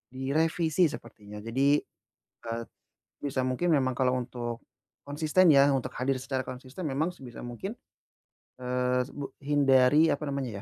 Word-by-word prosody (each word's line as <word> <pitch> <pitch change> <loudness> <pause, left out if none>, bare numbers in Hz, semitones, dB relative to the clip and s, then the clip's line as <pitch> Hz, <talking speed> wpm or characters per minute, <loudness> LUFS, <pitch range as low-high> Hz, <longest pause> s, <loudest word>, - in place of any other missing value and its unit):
direvisi 160 +5 +1
sepertinya. 105 -7 -9
Jadi, 135 +5 +2 0.7
eee 115 0 -3 0.6
sebisa 140 -2 -1
mungkin 130 +8 0
memang 130 -3 +2
kalau 130 -1 +2
untuk 120 -1 -5 0.5
konsisten 155 +5 +3
ya, 140 0 +6
untuk 135 -2 -1
hadir 130 +1 0
secara 130 0 -3
konsisten 130 +7 -7
memang 145 +5 0
sebisa 130 -8 -11
mungkin, 120 - -5 0.9
eee, 125 0 0
s - - -14
bu 145 -1 -6
hindari 140 +1 +4
apa 150 - -3
namanya 130 -7 -3
135 Hz, 135 wpm, -28 LUFS, 125-145 Hz, 0.9 s, ya